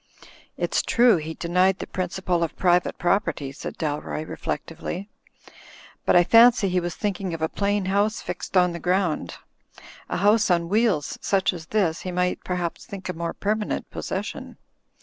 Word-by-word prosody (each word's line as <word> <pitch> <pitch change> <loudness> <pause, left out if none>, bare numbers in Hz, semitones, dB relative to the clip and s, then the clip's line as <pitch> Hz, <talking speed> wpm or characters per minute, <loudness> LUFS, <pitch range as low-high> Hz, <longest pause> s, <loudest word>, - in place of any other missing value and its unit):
"It's - - +1
true 240 -4 +4
he 160 0 -5
denied 180 +2 +2
the - - -5
Principle 180 -1 -2
of 165 - -1
Private 180 -1 +2
Prop 195 +4 +2
erty," 145 -4 -4
said - - -7
Dalroy, 155 0 -3
reflectively, 170 +6 -5 1.0
"but - - +4
I 175 - +7
fancy 230 0 +6
he 180 0 +1
was 175 -1 -4
thinking 195 -4 -2
of 160 - -9
a - - +3
plain 200 +2 -1
house 205 +3 +1
fixed 180 +1 -4
on 180 -1 +4
the 170 - -6
ground. 180 -2 0 0.7
A - - -1
house 210 +3 +3
on 170 -1 +2
wheels, 210 -8 +1
such 190 -2 +1
as 165 -2 -9
this, 180 -6 0
he 185 - -4
might 180 0 -1
perhaps 180 -2 -3
think 195 -2 -8
a - - -1
more 170 0 -4
permanent 210 +1 -2
possession. - - -5
180 Hz, 170 wpm, -24 LUFS, 170-200 Hz, 1.0 s, I